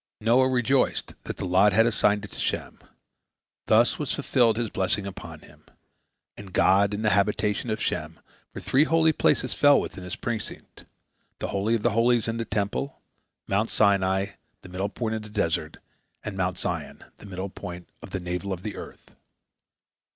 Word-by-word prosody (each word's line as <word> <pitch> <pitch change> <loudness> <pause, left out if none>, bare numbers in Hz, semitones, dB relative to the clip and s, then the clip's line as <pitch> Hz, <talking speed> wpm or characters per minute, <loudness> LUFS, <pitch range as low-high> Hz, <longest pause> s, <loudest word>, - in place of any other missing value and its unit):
Noah 125 +4 +4
rejoiced 130 +1 +1
that - - -5
the - - -4
lot 95 +3 +4
had 110 +3 +5
assigned 105 -2 +2
it - - -13
to - - -8
Shem. - - -3 0.9
Thus - - +4
was - - -1
fulfilled 115 -3 +2
his 115 -3 -2
blessing 95 +1 0
upon 100 - -8
him, - - -18 0.7
"And 100 -2 -11
God 100 +2 +4
in 105 - -4
the 105 - +3
habitation 105 +2 +1
of 110 0 -1
Shem," 80 -4 -3 0.3
for - - -7
three 140 +4 +3
holy 160 0 +3
places - - +2
fell 145 -1 +5
within 90 - -6
his 90 - -5
precincts—the 115 -3 -8
Holy 100 +4 +1
of 110 - -3
Holies 120 0 +3
in 115 0 -2
the 115 - -2
Temple, 105 +6 -2 0.5
Mount 105 +3 +1
Sinai, 95 -2 +2 0.3
the - - -11
middle 95 +3 -2
point 110 +1 -3
of 110 - -3
the 105 - -10
desert, 85 -7 -1 0.5
and 105 - -5
Mount 95 -1 -1
Zion, - - -4
the 105 - -12
middle 95 0 -5
point 90 -2 -8
of - - -10
the 95 - -3
navel 90 +2 -4
of 90 -1 -4
the 105 -2 -5
earth. - - -11
105 Hz, 175 wpm, -26 LUFS, 95-115 Hz, 0.9 s, had